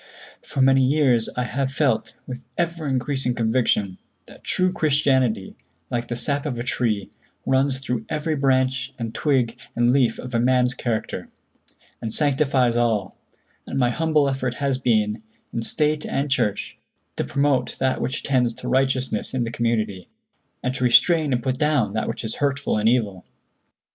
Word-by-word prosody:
For 135 - -1
many 135 0 +5
years 130 -4 +3
I 125 - +1
have 135 +2 -2
felt, 140 -1 0
with 125 -1 -7
ever 170 -2 -1
increasing 130 -1 -1
conviction, 110 -5 +1 0.3
that - - -16
true 185 0 +1
Christianity, 135 - +1 0.4
like 120 0 -2
the 120 - -3
sap 140 +4 -2
of 125 -5 -3
a 120 - -3
tree, 115 -5 -1 0.3
runs 135 0 +2
through 125 -4 -3
every 155 +1 -1
branch 130 -1 +1
and 115 -2 -4
twig 130 -6 +1 0.2
and 120 +1 +3
leaf 125 -5 +2
of 125 0 -8
a 115 - +2
man's 125 +1 +3
character, 120 -4 -3 0.7
and 110 - -3
sanctifies 135 -3 +2
all; 115 -5 0 0.5
and - - -4
my 125 -2 +3
humble 155 -1 +2
effort 130 -2 -2
has 140 -2 -1
been, 110 -3 +1 0.3
in 115 - -1
State 150 +5 0
and 140 +1 -2
Church, 105 -6 -1 0.4
to - - -1
promote 140 -3 0
that 130 -1 0
which 130 - -2
tends 125 -4 +1
to 125 - -8
righteousness 130 -2 0
in 125 - +1
the 115 - -3
community, 110 -6 -1 0.6
and 125 - 0
to 130 - -3
restrain 150 +5 +4
and 120 -2 0
put 130 -1 -1
down 145 -9 +2
that 110 - -1
which - - -4
is 110 0 -3
hurtful 140 -1 0
and 105 +1 +3
evil. 105 -7 0
130 Hz, 165 wpm, -23 LUFS, 120-140 Hz, 0.7 s, many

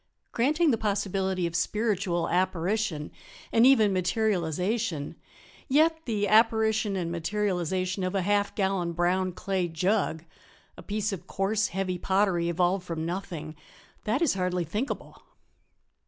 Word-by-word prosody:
"Granting 300 +6 +2
the 225 - 0
possibility 195 -3 -1
of 170 -1 -3
spiritual 190 -3 0
apparition 180 -2 -1 0.4
and 230 +2 +6
even 220 -7 +5
materialization, 185 -2 -1 0.5
yet 320 +3 +3
the 210 -3 0
apparition 220 -1 +3
and 170 -3 -2
materialization 185 0 -1
of 185 +2 -2
a 190 - +1
half 205 +1 +1
gallon 190 -4 0
brown 180 +2 +1
clay 185 0 -2
jug 170 0 0 0.5
a - - -11
piece 210 0 -2
of 180 -1 -7
coarse, 205 +2 0
heavy 185 0 -3
pottery 190 -3 +1
evolved 180 +2 +1
from 165 -3 -4
nothing 165 -3 -5 0.5
that 240 +9 +1
is 320 - +3
hardly 180 -2 -1
thinkable." 210 - -4
190 Hz, 125 wpm, -27 LUFS, 175-215 Hz, 0.5 s, and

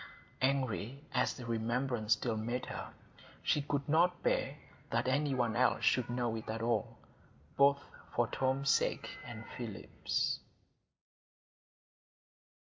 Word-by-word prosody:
Angry 130 -1 0
as 125 -1 +2
the 125 - -8
remembrance 115 0 +1
still 115 -3 -1
made 120 +3 -2
her, - - -6 0.5
she 150 - +3
could 140 0 -2
not 175 +3 +3
bear 140 +2 +1 0.3
that 115 +2 +1
any 140 +1 +2
one 120 -3 +1
else 125 +1 +3
should 125 -2 +3
know 120 -2 0
it 110 - -6
at 115 +1 -2
all, 115 -2 0 0.6
both 140 0 +5 0.3
for 120 - +4
Tom's 135 +3 +1
sake - - +1
and - - -7
Philip's. - - -2
125 Hz, 120 wpm, -34 LUFS, 115-140 Hz, 0.6 s, both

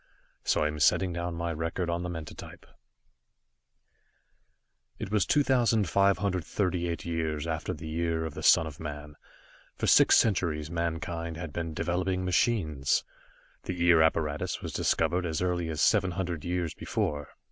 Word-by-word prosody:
So - - +2
I - - +2
am 75 0 -4
setting 90 +4 +3
down 85 0 -3
my 85 0 -2
record 85 +3 -2
on 85 0 -1
the 90 - -4
mentatype. 80 -3 -8 2.3
It 95 - -6
was 105 -3 +2
2538 100 - +1
years 80 -3 -2
After 80 -1 -3
the 80 +1 -7
Year 80 0 -1
of 80 - -5
the - - -7
Son 80 - +5
of 75 -3 -8
Man. 75 -1 -7 0.6
For - - -2
six - - +6
centuries 85 -8 +1
mankind 85 0 -3
had 80 -3 -6
been 80 -2 -4
developing 90 +2 -1
machines. 80 - +1 0.6
The 90 - -4
Ear 85 -2 +7
apparatus 80 -2 0
was - - -6
discovered 90 +1 +1
as 80 -2 -2
early 90 -2 -1
as 80 -1 -1
seven 100 -4 +3
hundred 90 -3 -3
years 85 -2 -2
before. 75 -1 -3
85 Hz, 145 wpm, -28 LUFS, 80-90 Hz, 2.3 s, Ear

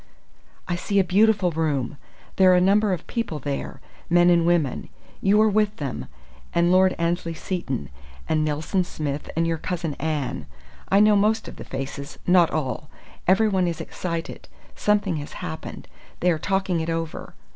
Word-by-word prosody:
"I 175 - 0
see 200 +3 -2
a 195 - +6
beautiful 200 0 +3
room. 150 -4 -1 0.4
There 185 -1 +6
are - - +6
a - - +5
number 200 +3 +3
of 180 -2 -3
people 230 -10 -3
there 140 -1 -5 0.3
men 175 0 +5
and 170 -1 +3
women. 170 -6 +1 0.3
You 200 +2 +4
are - - +4
with 210 0 +2
them, 140 - -5 0.5
and 170 +1 +3
Lord 185 0 +4
Annesley 170 0 -1
Seton 135 - -4 0.4
and 155 -1 +1
Nelson 155 +5 0
Smith 150 -4 -4
and 165 +1 +1
your 165 -1 -1
cousin 170 -3 -3
Anne. 145 - -2 0.4
I 195 +1 +5
know 210 0 +6
most 215 +2 +2
of - - -9
the - - -7
faces 135 +1 -6
not 180 -2 +5
all. 150 0 -3 0.4
Everyone 190 -1 +3
is 170 -2 -3
excited. 170 -2 -5 0.3
Something 205 -5 +1
has 145 0 -7
happened. - - -7 0.3
They 180 - +4
are 160 - -1
talking 190 -1 0
it 160 +1 -3
over.... 165 -1 -4
175 Hz, 165 wpm, -24 LUFS, 155-190 Hz, 0.5 s, a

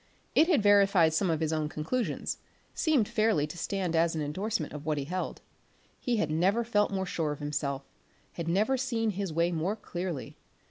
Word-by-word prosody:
It 320 - +5
had 300 - +3
verified 195 -5 +5
some 185 +3 +1
of 160 -1 0
his 160 0 0
own 155 -1 -1
conclusions; 195 +12 -2 0.3
seemed 295 -10 +2
fairly 215 -9 +2
to 150 - -8
stand 180 0 -2
as 165 0 +3
an 155 - -1
endorsement 165 +2 -2
of 150 -1 -6
what 155 -1 -1
he 140 - -1
held. 180 +6 -4 0.6
He 240 -2 0
had 160 -7 0
never 190 +9 +2
felt 210 -3 +2
more 190 -1 -2
sure 165 -4 -1
of 145 - -4
himself, 145 -2 -3 0.5
had 170 -1 -5
never 210 +10 +2
seen 230 -4 0
his 195 -2 -3
way 170 +2 +1
more 170 +5 -1
clearly. 175 -8 -5
180 Hz, 190 wpm, -29 LUFS, 155-210 Hz, 0.6 s, It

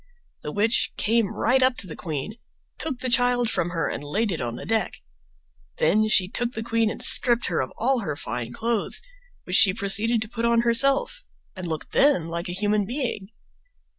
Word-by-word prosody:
The - - -6
witch 220 +3 0
came 225 0 +2
right 250 +4 +1
up 255 -1 +2
to - - -6
the 170 - -8
queen, 160 +6 -5 0.4
took 305 -5 -3
the 260 - -2
child 245 -1 +2
from 170 - -1
her, 165 -3 -2
and - - -5
laid 200 +9 -1
it 160 -5 -3
on 120 -1 -4
the - - -8
deck; 225 0 0 0.8
then 215 +1 +2
she 190 -4 +3
took 240 +5 -3
the 225 - -5
queen 230 -1 0
and - - -4
stripped 240 -1 +5
her 170 - 0
of 130 - -5
all 255 +3 +1
her 155 -10 -4
fine 120 -4 -5
clothes, 225 - -2 0.4
which 180 - +3
she 185 -2 +6
proceeded 215 +3 +2
to - - -10
put 230 +1 -6
on 235 0 +3
herself 275 - +2 0.3
and 185 -2 -6
looked 160 -2 -5
then 270 - +3
like 170 +1 -4
a - - -3
human 205 +1 0
being. 240 -6 -3
220 Hz, 195 wpm, -24 LUFS, 180-240 Hz, 0.8 s, she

